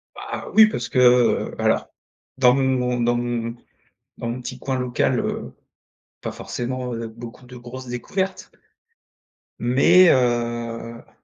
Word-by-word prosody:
Bah, - - -7
oui 220 0 +8
parce 120 - -4
que, 130 - +1
heu, 125 -1 +4
bah, - - -4
alors, - - +1 0.5
dans 125 -1 +5
mon 125 -2 +1
dans 120 +1 +2
mon 120 -1 -2 0.6
dans 115 - -4
mon 125 +2 -4
petit 125 - -7
coin 130 -1 -2
local, 125 -1 0
heu, - - -4 0.7
pas - - -4
forcément, 125 0 -4
heu, 115 0 -4
beaucoup 120 +2 -11
de 125 - -12
grosses 125 +1 -9
découvertes 190 - -3 1.1
mais 165 +10 +5
heu 120 -2 -1
125 Hz, 140 wpm, -22 LUFS, 120-130 Hz, 1.1 s, oui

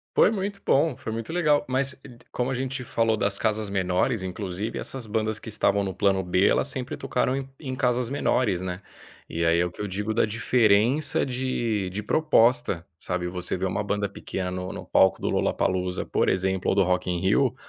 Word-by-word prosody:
Foi - - +6
muito 200 -1 -3
bom, 140 -1 +3
foi 110 - -6
muito 115 +6 -5
legal, 150 -4 +2
mas, 130 +1 0 0.3
como 125 +2 -1
a - - 0
gente 130 0 -3
falou 115 -2 +1
das 100 0 -1
casas 110 -1 0
menores, 95 +4 0
inclusive 95 +2 -4
essas 130 -4 -5
bandas 110 0 -1
que - - -9
estavam 100 -1 +2
no 95 - -2
plano 95 0 +1
B, 90 +2 +2
elas - - +2
sempre 130 -2 -3
tocaram 125 +1 0
em 135 0 -4
em 130 -4 -5
casas 125 -1 0
menores, 120 -9 +1
né, 90 +1 -5 0.4
e 85 - -2
aí 85 0 +3
é 90 - +3
o 90 - -4
que 90 - -9
eu 105 - -2
digo 105 +3 -2
da - - +3
diferença 115 +4 +2
de 120 -6 -1
de 100 +3 -5
proposta, 115 - +3
sabe? 90 -1 -3
Você 90 +1 -3
vê 95 - -2
uma 100 +2 -1
banda 100 0 -1
pequena 95 -2 -5
no 90 0 -4
no - - -7
palco 95 -1 +4
do - - -2
Lollapalooza, 90 -1 0
por - - +1
exemplo, 95 0 0
ou - - +2
do 100 - +4
Rock 90 0 0
in 90 -1 0
Rio, 115 +8 +2
105 Hz, 205 wpm, -25 LUFS, 95-125 Hz, 0.4 s, Foi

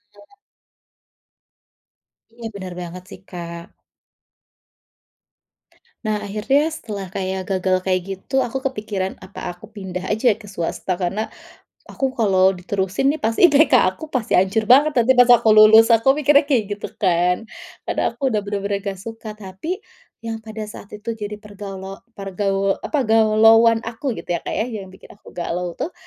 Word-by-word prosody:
heeh. 205 - -20 2.0
Iya 230 - -5
benar 185 -2 -7
banget 180 +1 -7
sih, - - -11
Kak. 170 -2 -7 2.4
Nah, 215 -1 0
akhirnya 215 +9 +1
setelah 200 - -7
kayak 190 0 -3
gagal 185 -1 +1
kayak 185 -1 +1
gitu, 195 +8 -1
aku 245 +1 -2
kepikiran, 210 -6 -3
apa 185 -1 -7
aku 195 +5 -15
pindah 190 -4 -6
saja 220 +2 +3
ke 210 0 -13
swasta 180 0 -3
karena, 195 +5 -2 0.6
aku 270 - -2
kalau 190 -3 +4
diterusin 190 +8 0
nih 315 - -7
pasti 225 +10 +5
IPK 295 +2 +4 0.2
aku 315 - -9
pasti 250 -6 -2
hancur 195 +4 +2
banget. 280 +5 +5
Nanti 240 +2 +5
pas 245 0 +6
aku 230 -2 +6
lulus, 215 +1 +8
aku 250 +5 +4
mikirnya 290 0 +5
kayak 250 -7 +2
gitu 205 - -5
kan, 180 +1 +1 0.4
karena - - 0
aku 275 - -1
sudah 210 - +1
benar-benar 200 0 -3
enggak 195 -1 -4
suka, 220 +1 -8
tapi, 210 - -5 0.5
yang 225 -1 -4
pada 220 0 -7
saat 210 -1 -11
itu 220 +2 -5
jadi 210 -1 -6
pergaluo 195 -2 -9 0.2
pergaul 195 0 -1
apa 290 -4 -1
galauan 225 +1 +5
aku 235 +2 -4
gitu - - -5
ya, 170 - -1
Kak, - - -5
ya, - - +1
yang 215 -6 -7
bikin 185 - -15
aku 205 - -18
galau 175 0 -3
tuh, 340 - -4
210 Hz, 155 wpm, -21 LUFS, 190-225 Hz, 2.4 s, lulus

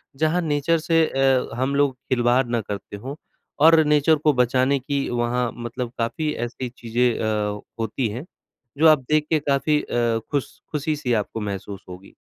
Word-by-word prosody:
जहाँ 160 +5 +1
नेचर 150 +1 +1
से 165 0 +3
अ, 135 -1 +2
हम 130 +3 -1
लोग 140 -2 +2
खिलवाड़ 125 0 +3
ना 120 -1 0
करते 100 0 -7
हों 130 +7 -7 0.5
और 160 -1 +7
नेचर 150 +1 +4
को 150 0 +2
बचाने 130 +2 +2
की 140 +1 -2
वहाँ 120 0 0
मतलब 120 0 -5
काफ़ी 150 +7 -1
ऐसी 125 +1 -6
चीज़ें 120 0 -1
अ, 105 -2 -1 0.2
होती 115 +2 -1
हैं, 125 +8 -6 0.5
जो 160 +2 +5
आप 155 -2 +5
देख 155 -1 +3
के 160 - +3
काफ़ी 150 +2 +2
अ, 120 -1 0
खुश 145 -3 -3
खुशी-सी 150 -4 -1
आपको 110 - -7
महसूस 100 -1 -5
होगी। 90 +2 -11
130 Hz, 165 wpm, -23 LUFS, 120-150 Hz, 0.5 s, और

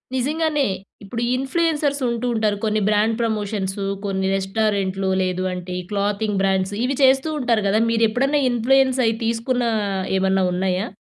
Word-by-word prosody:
నిజంగానే. 300 +2 0 0.4
ఇప్పుడు 230 +4 -5
ఇన్‌ప్లు‌యెన్సర్స్ 290 +1 0
ఉంటూ 235 0 -2
ఉంటారు. 215 -2 0
కొన్ని 215 0 +1
బ్రాండ్ 215 +2 +2
ప్రమోషన్సు, 205 -3 -2 0.2
కొన్ని 190 -1 -1
రెస్టారెంట్లు, 195 -1 -1
లేదు 185 0 -2
అంటే 180 0 -6
ఈ - - -11
క్లాతింగ్ 205 0 -1
బ్రాండ్స్ 190 0 +1
ఇవి 265 +2 0
చేస్తూ 265 +3 +4
ఉంటారు 235 -5 +1
కదా! 210 +3 +2
మీరు 230 0 +3
ఎప్పుడైనా 275 +6 +1
ఇన్‌ప్లు‌యెన్స్ 260 +2 +2
అయి 225 - +2
తీసుకున్న 235 +2 0 0.5
ఏమన్నా 190 0 +2
ఉన్నాయా? 185 +3 -1
220 Hz, 140 wpm, -21 LUFS, 195-255 Hz, 0.5 s, చేస్తూ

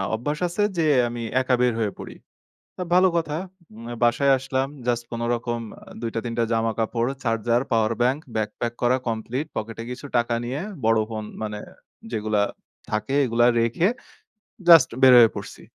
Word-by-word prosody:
অভ্যাস 145 +6 -3
আছে 190 +4 -1
যে, 165 - +2 0.2
আমি 120 0 -5 0.2
একা 130 -1 +2
বের 125 -2 +3
হয়ে 105 -2 0
পড়ি। - - -8 0.6
তা - - -5
ভালো 185 +1 +6
কথা। 155 -3 -2 0.4
উম 115 +1 -10 0.2
বাসায় 135 +4 +3
আসলাম, 130 +1 -2 0.2
জাস্ট 120 -1 0
কোনরকম 120 0 -2 0.2
আ - - -23 0.2
২ 115 - -2
টা 115 - +1
৩ 120 - -3
টা - - +3
জামা 115 0 +1
কাপড়, 115 +1 0 0.2
চার্জার, 115 0 +1
পাওয়ার 110 -1 +2
ব্যাংক, 130 +4 +2 0.2
ব্যাগপ্যাক 110 +2 -2
করা 125 +1 +3
কমপ্লিট, 115 +5 -2
পকেটে 115 +1 -5
কিছু 125 - -8
টাকা 120 0 +1
নিয়ে 125 +4 -3 0.3
বড় 115 0 +4
ফোন 110 -1 -4 0.2
মানে 105 -1 -4 0.5
যেগুলা 110 -2 0 0.5
থাকে, 105 +4 -2
এগুলা 120 -1 +2
রেখে, 115 +10 +2 0.8
জাস্ট 165 -6 +8
বের 130 -1 +8
হয়ে 115 -2 +8
পড়ছি। - - -8
120 Hz, 170 wpm, -24 LUFS, 115-130 Hz, 0.8 s, জাস্ট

